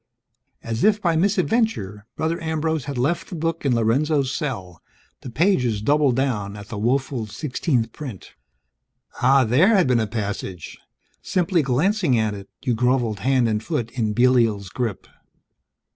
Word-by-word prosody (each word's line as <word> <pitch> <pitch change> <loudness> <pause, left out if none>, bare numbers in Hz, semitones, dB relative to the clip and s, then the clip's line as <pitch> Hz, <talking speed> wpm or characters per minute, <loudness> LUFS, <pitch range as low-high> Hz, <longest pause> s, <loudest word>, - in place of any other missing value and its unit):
As 115 +1 -3
if 210 0 +4
by 170 -5 +1
misadventure, 185 - 0
Brother 160 +2 -2
Ambrose 160 -2 -1
had 140 -2 -5
left 170 +9 -1
the - - -6
book 165 0 -2
in 125 - +2
Lorenzo's 135 +4 +1
cell, 95 - -5 0.4
the - - -7
pages 125 - +1
doubled 140 +3 +2
down 110 -7 -1
at 105 -1 -11
the 110 - -5
woeful 125 0 -1
sixteenth 125 - -2
print. 130 -11 -8 0.9
Ah, 130 +2 +5
there 130 - +4
had 185 -4 +4
been 125 -2 +2
a 110 - 0
passage! 100 -5 -5 0.4
Simply 180 -1 +1
glancing 150 - +1
at 110 -1 0
it, 100 -1 -9
you 125 - +1
groveled 120 -2 +1
hand 130 +2 +2
and 105 -1 0
foot 115 +1 -3
in 110 -4 -1
Belial's 115 -5 +2
grip. 115 -1 -3
125 Hz, 150 wpm, -22 LUFS, 110-155 Hz, 0.9 s, Ah